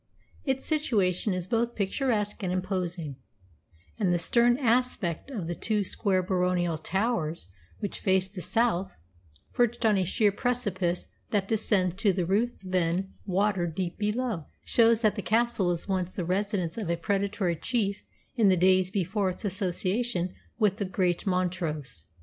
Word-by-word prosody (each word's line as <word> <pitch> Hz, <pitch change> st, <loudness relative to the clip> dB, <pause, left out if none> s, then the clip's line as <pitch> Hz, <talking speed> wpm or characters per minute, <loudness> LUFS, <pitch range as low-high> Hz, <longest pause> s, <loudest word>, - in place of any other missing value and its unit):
Its 265 Hz, -2 st, -1 dB
situation 215 Hz, -, +1 dB
is 180 Hz, -2 st, -2 dB
both 235 Hz, +4 st, 0 dB
picturesque 210 Hz, +1 st, -1 dB
and 185 Hz, -2 st, -1 dB
imposing, 180 Hz, -5 st, -3 dB, 0.8 s
and 190 Hz, -5 st, +2 dB
the 175 Hz, -, +3 dB
stern 235 Hz, +8 st, +4 dB
aspect 245 Hz, -, 0 dB
of 220 Hz, -11 st, -4 dB
the 170 Hz, -, -2 dB
two 210 Hz, +3 st, 0 dB
square 190 Hz, -1 st, 0 dB
baronial 180 Hz, -2 st, +1 dB
towers 170 Hz, -, -1 dB, 0.3 s
which 205 Hz, -, -3 dB
face 190 Hz, 0 st, +2 dB
the 190 Hz, -1 st, -8 dB
south, 210 Hz, -, 0 dB, 0.6 s
perched 240 Hz, -1 st, +1 dB
on 210 Hz, -3 st, +4 dB
a -, -, +2 dB
sheer 205 Hz, +3 st, +2 dB
precipice 195 Hz, -7 st, -1 dB, 0.2 s
that 200 Hz, -2 st, 0 dB
descends 205 Hz, -5 st, +2 dB
to 195 Hz, +2 st, +2 dB
the 180 Hz, -1 st, -1 dB
Ruthven 190 Hz, -3 st, 0 dB
Water 190 Hz, -1 st, +1 dB
deep 175 Hz, +3 st, -4 dB
below, 210 Hz, -, -1 dB, 0.2 s
shows 230 Hz, -1 st, +4 dB
that 215 Hz, -3 st, +3 dB
the 205 Hz, -, -4 dB
castle 225 Hz, -2 st, +1 dB
was 175 Hz, +1 st, -1 dB
once 185 Hz, -2 st, -1 dB
the 180 Hz, -, -4 dB
residence 185 Hz, 0 st, -1 dB
of 200 Hz, -6 st, -3 dB
a 170 Hz, -, +1 dB
predatory 195 Hz, 0 st, 0 dB
chief 200 Hz, +1 st, -1 dB, 0.3 s
in 220 Hz, -5 st, +4 dB
the 185 Hz, -, +4 dB
days 185 Hz, +1 st, +4 dB
before 195 Hz, +1 st, 0 dB
its 185 Hz, +4 st, -5 dB
association 185 Hz, 0 st, 0 dB, 0.2 s
with 210 Hz, -3 st, +2 dB
the 205 Hz, -, -1 dB
great 185 Hz, 0 st, 0 dB
Montrose. 170 Hz, -, -2 dB
190 Hz, 150 wpm, -28 LUFS, 180-220 Hz, 0.8 s, stern